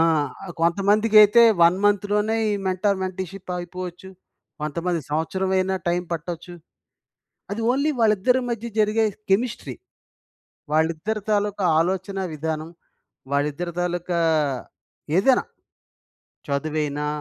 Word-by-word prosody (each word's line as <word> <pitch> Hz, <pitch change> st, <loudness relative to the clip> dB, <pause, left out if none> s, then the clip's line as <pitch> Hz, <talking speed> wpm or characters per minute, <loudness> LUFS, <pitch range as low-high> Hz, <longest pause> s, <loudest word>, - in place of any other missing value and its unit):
ఆ! -, -, +5 dB, 0.6 s
కొంతమందికైతే 210 Hz, +5 st, +5 dB, 0.2 s
1 170 Hz, +2 st, +6 dB
మంత్‌లోనే 205 Hz, +2 st, +2 dB
ఈ -, -, +1 dB
మెంటార్ 190 Hz, +1 st, +1 dB
మెంటల్షిప్ 185 Hz, 0 st, -6 dB
అగిపోవచ్చు. 180 Hz, +1 st, -7 dB, 0.5 s
కొంతమంది 170 Hz, +3 st, -2 dB
సంవత్సరమైనా 190 Hz, +4 st, 0 dB
టైం 175 Hz, +1 st, +1 dB
పట్టొచ్చు. 170 Hz, +2 st, -5 dB, 1.0 s
అది 220 Hz, -, -3 dB
ఓన్లీ 280 Hz, +4 st, +1 dB
వాళ్ళిద్దరి 225 Hz, +4 st, +3 dB
మధ్య 235 Hz, 0 st, -3 dB
జరిగే 215 Hz, +1 st, +3 dB, 0.2 s
కెమిస్ట్రీ. 230 Hz, +4 st, 0 dB, 1.0 s
వాళ్ళిద్దరి 165 Hz, +7 st, 0 dB
తాలూకా 205 Hz, -1 st, 0 dB, 0.2 s
ఆలోచనా 190 Hz, +2 st, -1 dB
విధానం. 155 Hz, +1 st, -3 dB, 0.6 s
వాళ్ళిద్దరి 150 Hz, +5 st, -1 dB
తాలూకా 175 Hz, 0 st, -1 dB, 1.0 s
ఏదైనా, 250 Hz, +7 st, +4 dB, 1.0 s
చదువైనా, 150 Hz, 0 st, -2 dB
185 Hz, 90 wpm, -23 LUFS, 170-210 Hz, 1.0 s, 1